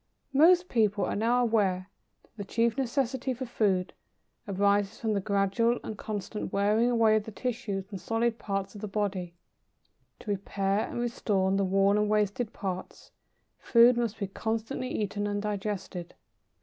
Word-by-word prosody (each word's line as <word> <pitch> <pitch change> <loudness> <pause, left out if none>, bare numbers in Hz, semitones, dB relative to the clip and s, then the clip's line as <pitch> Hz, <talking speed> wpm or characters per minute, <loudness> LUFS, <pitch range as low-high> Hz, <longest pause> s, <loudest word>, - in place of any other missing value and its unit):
Most 350 +5 +6
people 215 - +1
are - - -2
now 235 +4 +2
aware 195 -5 +1 0.3
that - - -30
the 205 - -5
chief 230 +3 +1
necessity 260 0 -1
for 260 +2 -5
food 195 -6 0 0.5
arises 200 +1 +1
from 220 -2 0
the 200 - +1
gradual 200 +4 +1
and 220 - -5
constant 210 0 -5
wearing 210 +4 +2
away 225 -2 +4
of 210 - -3
the 220 - -7
tissues 220 -4 -3
and 195 -3 -6
solid 230 +2 0
parts 195 -1 -3
of 205 - -10
the 210 - -3
body. 195 -4 -2 0.9
To 210 - -4
repair 200 +1 -1
and - - -4
restore 205 -5 0
the 195 0 +2
worn 195 +2 +3
and 210 0 +1
wasted 210 +2 0
parts, 185 -2 -6 0.5
food 235 0 +6
must 235 -2 -1
be 200 - -2
constantly 225 +6 -3
eaten 205 -2 -2
and 205 0 -1
digested. 200 -4 -4
210 Hz, 160 wpm, -29 LUFS, 195-230 Hz, 0.9 s, Most